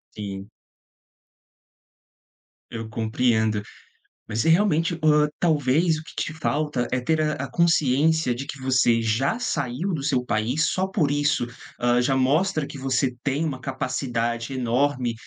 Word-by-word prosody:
Sim. 100 -1 -6 2.2
Eu 115 -1 -5
compreendo. 110 -1 +1 0.7
Mas 110 - -3
você 165 - +2
realmente, 170 -2 +2
hã, 150 -1 +4
talvez 155 0 +2
o - - -10
que - - -14
te 155 - -5
falta 150 -4 -1
é 130 - +1
ter 155 +5 0
a 150 0 +1
a 130 - -11
consciência 160 -3 +2
de 130 +3 -6
que 140 - -7
você 125 -3 +3
já 115 - 0
saiu 155 - -2
do 150 - -2
seu 135 -3 0
país, 125 +7 0
só 190 +1 0
por 165 -7 0
isso, 145 -3 +1 0.3
hã, 120 0 +3
já 135 +2 +1
mostra 150 +5 +1
que - - -10
você 130 -1 0
tem 140 +3 0
uma 135 -5 -4
capacidade 120 -2 -2
enorme 125 0 0
135 Hz, 145 wpm, -24 LUFS, 120-155 Hz, 2.2 s, hã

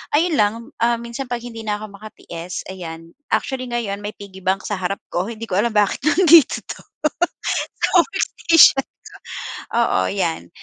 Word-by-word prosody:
ayun 325 0 +2
lang, 205 +1 +4 0.3
ah, 235 0 +3
minsan 235 +3 -6
'pag 240 -1 -3
hindi 230 -2 -8
na'ko 210 0 -3
makatiis, 180 -4 -8
ayan 165 -2 -8 0.2
actually, 255 -2 -3
ngayon 220 -4 -2
may 210 - -4
piggy 195 -2 -11
bank 190 +1 0
sa 205 -3 -3
harap 190 +2 -2
ko. 180 +4 -1
Hindi 230 0 -7
ko 185 +1 +1
alam 235 +1 +1
bakit 205 +4 +2
nandito 335 -2 +6
'to, - - -6 1.0
sa - - +3
workstation 330 -7 +4
ko. - - -3 0.9
Oo - - +2
'yan. 175 -6 -2
210 Hz, 160 wpm, -21 LUFS, 190-245 Hz, 1.0 s, nandito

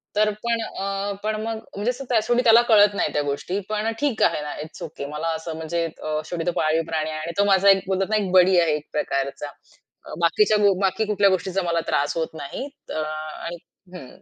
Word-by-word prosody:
तर 210 0 +3
पण 235 -1 0
अ, 195 -1 -3
पण 215 0 0
मग 225 0 -3 0.2
म्हणजे 205 +5 0
शेवटी 240 -2 0
त्याला 230 0 +7
कळत 205 -2 +6
नाही - - -1
त्या 150 - +1
गोष्टी. 145 +7 -2
पण 215 +1 -1
ठीक 285 -6 +1
आहे - - +2
ना, 150 0 -5
इट्स 155 +1 -10
ओके 150 -3 -6
मला 150 +3 -3
असं 160 0 -6
म्हणजे 165 +1 -2
अ, 155 -1 -4
शेवटी 165 0 -4
तो - - +3
पाळीव 155 +1 +2
प्राणी 155 -1 -2
आहे 155 0 -4
आणि 160 +2 -4
तो - - +6
माझा 195 0 +5
एक 195 -1 +5
बोलतात 190 0 0
ना, 215 - +1
एक 200 -3 0
बडी 185 0 +6
आहे 165 -3 +2
एक 150 0 -7
प्रकारचा. 140 0 -2 0.7
बाकीच्या 210 +6 +3 0.2
बाकी 195 +3 +1
कुठल्या 205 -1 +3
गोष्टीचा 190 +1 0
मला 170 -1 0
त्रास 145 +1 0
होत 160 -1 0
नाही, 155 - -6 0.2
त - - -6
अ, - - -2
आणि 155 +2 -6 0.4
हं, 155 -8 -9
185 Hz, 210 wpm, -23 LUFS, 155-210 Hz, 0.7 s, त्याला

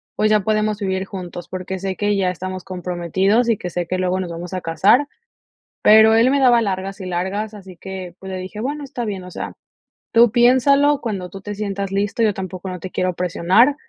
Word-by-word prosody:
pues 215 - +2
ya 215 -1 +4
podemos 215 0 0
vivir 190 -1 -1
juntos, 180 -3 -7
porque 185 0 -5
sé 190 0 -3
que 205 0 0
ya 190 -2 +1
estamos 185 0 -5
comprometidos 185 +5 0
y 220 - +2
que 180 - -5
sé 175 -1 -3
que 185 - -1
luego 185 0 0
nos 180 -2 -3
vamos 175 +2 -7
a 185 - -3
casar". 200 - +3 0.8
Pero 220 +1 +7
él 235 +3 +5
me 280 - +2
daba 245 -3 +5
largas 195 -1 -3
y - - -6
largas, 190 +4 -3
así 190 -4 -12
que, 185 -2 -8
pues 190 0 -8
le 185 - -4
dije: 190 +3 -7
"Bueno, 290 +4 -3
está 255 -4 -5
bien, 195 -4 -4
o 180 - -10
sea, - - -6 0.6
tú 230 -1 +5
piénsalo 275 +4 +4
cuando 195 -6 -4
tú 195 - -9
te 205 0 -6
sientas 200 -1 -3
listo, 205 +3 -1
yo 215 - +3
tampoco 185 0 -6
no 180 -1 -6
te 185 - -7
quiero 185 0 -1
presionar". 180 +10 +3
195 Hz, 215 wpm, -20 LUFS, 185-220 Hz, 0.8 s, Pero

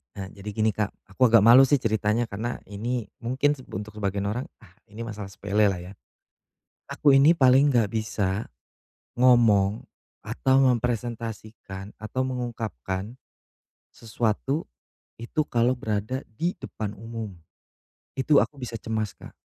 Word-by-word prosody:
Nah, 95 -1 -6
jadi 100 +2 -9
gini, 110 +1 +2
Kak, 105 0 -2 0.2
aku 125 +6 +2
agak 115 -3 +6
malu, 120 +5 +8
sih, 135 0 +2
ceritanya, 110 +1 0
karena 110 +4 -4
ini 115 +3 -3
mungkin 130 +5 0
seb 130 - -13
untuk 105 +2 -6
sebagian 100 -1 -1
orang, 125 +5 -3 0.2
ah, 105 - -17 0.2
ini 105 +3 -10
masalah 110 -3 -6
sepele, 100 +2 0
lah, 95 -3 0
ya. 90 +3 -10 1.0
Aku 140 -2 +4
ini 140 +4 +7
paling 140 -2 +5
enggak 115 -4 +3
bisa 105 -1 -2 0.7
ngomong 115 -5 +4 0.4
atau 130 0 +1
mempresentasikan 115 -5 -2
atau 110 +4 -3
mengungkapkan 110 - -4 0.8
sesuatu 115 +6 -2 0.5
itu 120 +7 -2
kalo 120 +1 +2
berada 110 +1 -3 0.2
di 175 +6 0
depan 105 -2 -6
umum. 115 -1 -6 0.8
Itu 140 +2 +4
aku 145 - -3
bisa 125 -3 -7
cemas, 110 -2 -2
Kak. - - -13
115 Hz, 135 wpm, -25 LUFS, 105-125 Hz, 1.0 s, malu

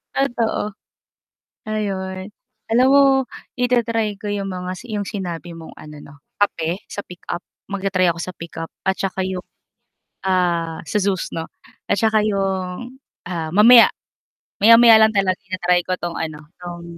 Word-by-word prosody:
Totoo. 230 -5 -1 0.9
Ayun 190 -2 -3 0.4
alam 250 +3 +5
mo 280 0 +6 0.6
i-ta-try 230 -4 +1
ko 205 0 -5
yung 200 -1 -3
mga 180 0 -5 0.2
yung 205 -1 -2
mga - - -11
si - - -8
sinabi 175 -2 -5
mong 165 -1 -11
ano 150 0 -11
'no, 145 - -13 0.3
kape 175 -2 0
sa 205 - -5
pickup, 180 0 -7 0.3
mag-ta-try 195 -2 +1
ako 170 - -2
sa 185 - -5
pickup 165 -1 -8 0.2
at 190 - +2
saka 195 0 -3
yung, 185 -1 -3 0.8
ah, 170 -3 0
sa 210 - -1
Zues 195 -2 -1
'no, 165 0 -4 0.4
at - - +1
saka 220 +1 +3
yung, 195 +5 -2 0.3
ah, 170 -3 -4
mamaya, 230 +3 +8 0.7
maya-maya 230 +1 +8
lang 220 - +3
talaga 190 -2 +2
ita 185 0 -5
try 180 0 +4
ko 185 - -1
'tong 175 -1 -4
ano, 155 -2 -5
'tong 175 -1 -8
190 Hz, 150 wpm, -20 LUFS, 175-215 Hz, 0.9 s, mamaya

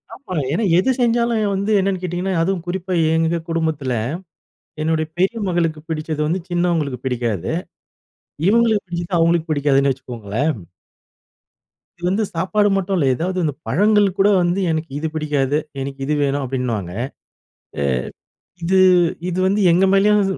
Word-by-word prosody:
ஆமா, 185 -10 -7 0.2
ஏன்னா 180 +9 0
எது 225 +9 +3
செஞ்சாலும் 235 -1 +2
வந்து 200 +3 -1
என்னன்னு 190 -1 0
கேட்டீங்கன்னா, 180 +2 -2
அதுவும் 180 0 -1
குறிப்பா 185 +1 -3 0.2
எங்க 165 +1 +1
குடும்பத்தில, 160 -5 -1 0.9
என்னுடைய 160 0 0
பெரிய 195 +6 +1
மகளுக்கு 165 -3 0
பிடிச்சது 155 -1 -3
வந்து, 175 +5 0
சின்னவங்களுக்கு 170 -7 0
பிடிக்காது. 115 - -1 1.0
இவங்களுக்கு 225 -2 +3
பிடிச்சது, 175 +1 -3
அவர்களுக்கு 165 0 +2
பிடிக்காதுன்னு 140 -2 +2
வச்சுக்கோங்களேன். 125 +2 -3 1.4
இது 175 - -18
வந்து 210 +3 +1
சாப்பாடு 205 +4 +2
மட்டும் 195 0 -1
இல்ல. 145 - +2
எதாவது 185 +6 -2
இந்தப் 150 0 -3
பழங்கள்கூட 200 - +3
வந்து 175 +2 +1
"எனக்கு 160 -1 -3
இது 160 - -2
பிடிக்காது, 145 -2 0 0.2
எனக்கு 135 0 -5
இது 150 - 0
வேணும்" 140 +1 0
அப்பிடின்னுவாங்க. 120 -8 -3 0.9
அ - - 0 0.8
இது, 190 +3 +3 0.5
இது 180 - -3
வந்து 200 +2 +1
எங்க 185 +3 +4
மேலயும் 205 +1 +4
170 Hz, 130 wpm, -20 LUFS, 145-190 Hz, 1.4 s, எங்க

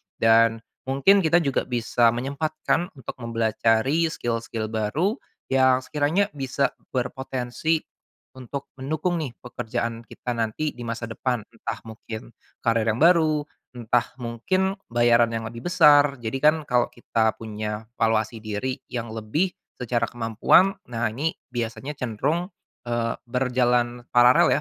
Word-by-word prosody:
Dan, 115 0 +4 0.2
mungkin 140 +10 +5
kita 170 -1 +3
juga 140 -3 0
bisa 120 -1 +2
menyempatkan 155 +6 -1
untuk 135 - -7
mempelajari 115 +6 +1
skill-skill 115 -6 -3
baru, 145 - 0 0.3
yang 130 -1 +4
sekiranya 155 +9 +1
bisa 135 -1 -1 0.2
berpotensi, 130 +4 -1 0.6
untuk 135 +2 -7
mendukung 155 +6 -1
nih, 150 -6 -3
pekerjaan 115 -2 -3
kita 125 - -5
nanti 115 +7 -1
di 120 - -11
masa 115 0 -4
depan, 115 +1 -2
entah 115 -1 -6
mungkin, 110 +1 -8 0.3
karir 115 -1 +2
yang 110 0 +1
baru, 160 -3 +4 0.3
entah 120 +1 +1
mungkin 185 +12 0 0.2
bayaran 120 0 +4
yang 115 0 -3
lebih 115 +1 -9
besar, 145 -5 +6
jadi 115 +3 -2
kan, 155 +1 +6
kalo 125 -3 +2
kita 115 -2 0
punya 105 0 -5
valuasi 110 0 +1
diri 120 +5 -3
yang 115 -2 -4
lebih, 115 - -1 0.3
secara 120 -1 0
kemampuan, 120 - +3 0.2
nah 120 -1 -1
ini, 155 +7 -1 0.2
biasanya 120 +4 -3
cenderung, 145 - -1 0.4
eee, 115 -1 0 0.2
berjalan 125 -1 +1
paralel 120 +1 +6
120 Hz, 125 wpm, -24 LUFS, 115-145 Hz, 0.6 s, besar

